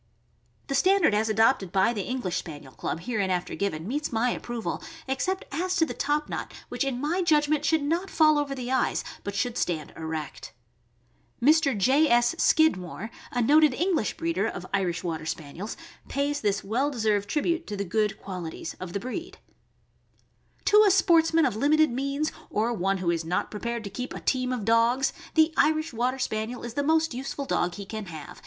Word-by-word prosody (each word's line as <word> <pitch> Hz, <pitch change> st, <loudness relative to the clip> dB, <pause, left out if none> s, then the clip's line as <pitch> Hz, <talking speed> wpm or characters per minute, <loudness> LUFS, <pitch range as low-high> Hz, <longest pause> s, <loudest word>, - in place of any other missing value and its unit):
The 275 Hz, -, -4 dB
standard 375 Hz, -, +4 dB
as 215 Hz, +1 st, +1 dB
adopted 215 Hz, -3 st, +3 dB
by 195 Hz, +5 st, +3 dB
the 210 Hz, -, -2 dB
English 225 Hz, -5 st, -2 dB
Spaniel 145 Hz, -4 st, -7 dB
Club, 165 Hz, -, -4 dB
hereinafter 190 Hz, -4 st, -1 dB
given, 175 Hz, -4 st, -2 dB
meets 290 Hz, +5 st, -2 dB
my 240 Hz, +2 st, +1 dB
approval, 240 Hz, -1 st, -4 dB, 0.3 s
except 370 Hz, +9 st, -1 dB
as 365 Hz, +5 st, -1 dB
to 325 Hz, -, +3 dB
the -, -, -5 dB
top 295 Hz, +1 st, 0 dB
knot, -, -, -5 dB, 0.2 s
which -, -, -1 dB
in 270 Hz, -3 st, -2 dB
my 320 Hz, +7 st, 0 dB
judgment 300 Hz, -3 st, +2 dB
should 310 Hz, +1 st, +2 dB
not 340 Hz, +6 st, -1 dB
fall 310 Hz, -3 st, +4 dB
over 280 Hz, -1 st, -2 dB
the 250 Hz, -1 st, -5 dB
eyes, 260 Hz, -1 st, +1 dB, 0.2 s
but 200 Hz, 0 st, -5 dB
should 245 Hz, +2 st, -1 dB
stand 155 Hz, -4 st, -2 dB
erect. 160 Hz, -9 st, -6 dB, 0.9 s
Mr. 280 Hz, -2 st, +4 dB
J. 275 Hz, +10 st, +4 dB
S. 240 Hz, +2 st, +4 dB
Skidmore, 220 Hz, -, +2 dB, 0.2 s
a 245 Hz, -1 st, 0 dB
noted 295 Hz, +1 st, +5 dB
English 340 Hz, -, 0 dB
breeder 170 Hz, +6 st, 0 dB
of 180 Hz, -, -5 dB
Irish 180 Hz, -3 st, 0 dB
Water 160 Hz, -3 st, -3 dB
Spaniels, 160 Hz, +6 st, -5 dB, 0.3 s
pays 285 Hz, +1 st, -1 dB
this 205 Hz, -2 st, 0 dB
well 245 Hz, +8 st, 0 dB
deserved 215 Hz, -6 st, 0 dB
tribute 335 Hz, +5 st, 0 dB
to 205 Hz, -, -4 dB
the 200 Hz, -, -2 dB
good 210 Hz, +3 st, 0 dB
qualities 180 Hz, -4 st, -6 dB
of 180 Hz, -2 st, -7 dB
the 200 Hz, -, -1 dB
breed: 290 Hz, -, -6 dB, 1.3 s
To 420 Hz, 0 st, +7 dB
a 415 Hz, -, +5 dB
sportsman 330 Hz, -4 st, +4 dB
of 250 Hz, -, 0 dB
limited 305 Hz, +5 st, +3 dB
means, 275 Hz, +4 st, -1 dB, 0.2 s
or 225 Hz, +3 st, 0 dB
one 195 Hz, -2 st, 0 dB
who 180 Hz, -2 st, 0 dB
is 165 Hz, -1 st, -1 dB
not 175 Hz, +3 st, -2 dB
prepared 235 Hz, +2 st, -4 dB
to 200 Hz, -, -7 dB
keep 250 Hz, +5 st, -5 dB
a -, -, -5 dB
team 255 Hz, -1 st, 0 dB
of 240 Hz, -5 st, -3 dB
dogs, 235 Hz, +4 st, +3 dB, 0.2 s
the 315 Hz, 0 st, +4 dB
Irish 310 Hz, -1 st, +2 dB
Water 250 Hz, +3 st, 0 dB
Spaniel 230 Hz, -1 st, -3 dB
is 240 Hz, -1 st, -6 dB
the 285 Hz, -, 0 dB
most 320 Hz, 0 st, +2 dB
useful 270 Hz, +2 st, -4 dB
dog 175 Hz, -8 st, 0 dB
he 200 Hz, -, -7 dB
can 215 Hz, +1 st, -6 dB
have, -, -, -14 dB
THE -, -, -4 dB
IRISH -, -, -7 dB
WATER -, -, -11 dB
SPANIEL. -, -, -19 dB
245 Hz, 195 wpm, -27 LUFS, 200-295 Hz, 1.3 s, To